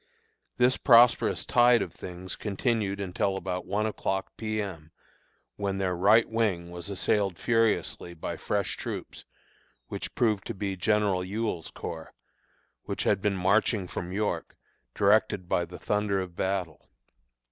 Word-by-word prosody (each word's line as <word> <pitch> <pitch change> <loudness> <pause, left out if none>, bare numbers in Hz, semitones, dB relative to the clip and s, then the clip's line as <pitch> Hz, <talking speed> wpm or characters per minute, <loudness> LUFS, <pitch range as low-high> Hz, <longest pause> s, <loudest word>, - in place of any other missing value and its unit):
This 125 +1 +4
prosperous 120 -1 +5
tide 120 -1 +5
of - - -8
things 90 +1 -7
continued 105 -1 -1
until 95 0 -1
about 90 -1 -4
one 105 +2 0
o'clock 95 -3 -2
P. 110 -1 -3
M., 85 -7 -5 0.7
when 100 -1 -2
their 95 -2 0
right 105 +6 +5
wing 100 -7 -1
was 90 +1 -5
assailed 95 0 0
furiously 115 -6 0
by 80 - -4
fresh - - -2
troops, - - -6 0.6
which - - -5
proved 110 -5 +1
to - - -4
be 100 0 -3
General 100 -1 +1
Ewell's 100 -3 -3
Corps, 80 -1 -7 0.7
which - - -3
had 100 -2 +2
been 100 -1 0
marching 100 +1 +2
from 90 0 -5
York, 95 -4 -2 0.4
directed 100 -3 +3
by 85 0 +1
the 90 +1 -10
thunder 105 -1 0
of 90 -2 -5
battle. 90 -4 -3
100 Hz, 140 wpm, -28 LUFS, 90-110 Hz, 0.7 s, prosperous